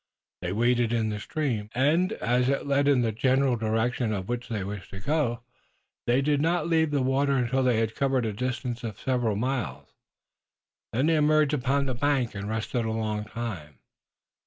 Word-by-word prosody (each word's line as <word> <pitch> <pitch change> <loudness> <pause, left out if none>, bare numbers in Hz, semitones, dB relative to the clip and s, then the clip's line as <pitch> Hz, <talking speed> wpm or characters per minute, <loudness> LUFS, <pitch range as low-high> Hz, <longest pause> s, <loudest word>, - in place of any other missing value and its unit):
They 90 0 -3
waded 120 +2 +2
in 110 -2 +1
the 105 0 -3
stream, 115 -7 -2
and, 155 +8 +2
as 125 +1 +1
it 140 - 0
led 140 0 +2
in 140 -3 +4
the 115 - +1
general 130 +3 +2
direction 115 +1 0
in 100 -3 -2
which 120 +3 -4
they 105 -4 -2
wished 100 -1 -6
to 95 - -8
go, 120 -1 -1 0.6
they 125 +3 +3
did 145 0 +2
not 170 +2 +1
leave 160 -2 +3
the 145 -3 +1
water 135 +2 +2
until 130 +1 +1
they 125 -3 +2
had 110 -1 0
covered 135 -2 +1
a 110 - -2
distance 125 +1 -3
of 110 -4 -5
several 120 -5 0
miles. 125 +3 -3 1.0
Then 130 +5 +1
they 160 0 +3
emerged 150 -1 +3
upon 140 0 +1
the 130 - -1
bank 130 -1 0
and 100 0 -5
rested 110 +2 -2
a 110 - -2
long 110 -1 -2
time. 100 - -6
125 Hz, 185 wpm, -27 LUFS, 110-140 Hz, 1.0 s, in